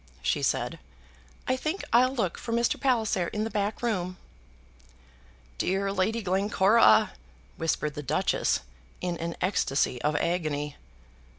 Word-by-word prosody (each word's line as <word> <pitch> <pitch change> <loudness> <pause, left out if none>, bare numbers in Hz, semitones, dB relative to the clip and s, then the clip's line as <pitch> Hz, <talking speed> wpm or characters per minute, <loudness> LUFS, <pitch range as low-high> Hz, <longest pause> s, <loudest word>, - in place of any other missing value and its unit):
she - - +1
said. - - -1 0.7
"I 255 - +2
think 310 +8 -3
I'll 255 +3 +5
look 195 -9 -1
for 230 - -6
Mr. 235 +1 +1
Palliser 220 -9 +1
in 210 +4 -2
the 225 - -3
back 210 +2 -2
room." 185 -6 -1 1.4
"Dear 195 +1 0
Lady 210 +4 0
Glencora," 195 +3 +4 0.5
whispered 150 -2 -1
the 150 - -5
Duchess, 155 +7 +1 0.4
in 180 -1 -2
an 170 0 -3
ecstasy 135 -8 +1
of 150 +1 +1
agony. 150 -3 -1
190 Hz, 125 wpm, -28 LUFS, 170-225 Hz, 1.4 s, I'll